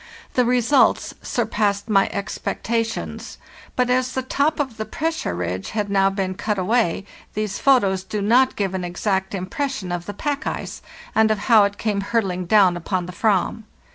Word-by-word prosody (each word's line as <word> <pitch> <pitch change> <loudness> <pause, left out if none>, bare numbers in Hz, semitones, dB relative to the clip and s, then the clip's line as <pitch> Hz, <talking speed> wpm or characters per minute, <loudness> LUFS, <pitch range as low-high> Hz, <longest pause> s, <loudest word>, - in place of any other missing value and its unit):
The 250 - +3
results 250 +3 +3
surpassed 205 0 -1
my 195 -3 +3
expectations; 225 +3 -3 0.4
but 250 -1 +2
as 255 0 +1
the 260 - -2
top 285 +4 0
of 260 -6 -2
the 220 - -3
pressure 320 - -2
ridge 90 +2 -3
had 205 -1 -1
now 195 -1 +4
been 195 -1 -2
cut 210 +2 -2
away, 195 -1 +1 0.3
these 210 -2 -2
photos 200 -9 +3
do 210 +2 -4
not 245 +6 +3
give 195 -2 -1
an 185 -1 -2
exact 190 +2 -1
impression 195 +2 -3
of 175 -1 -4
the 205 - -5
pack 290 +5 -2
ice, - - -4 0.3
and 220 0 +4
of 215 - +2
how 210 0 +5
it 200 0 -3
came 210 -3 -1
hurtling 195 -4 -1
down 195 -4 +5
upon 180 +1 -2
the 180 - -8
"vam. 215 +2 0
205 Hz, 170 wpm, -22 LUFS, 190-235 Hz, 0.4 s, how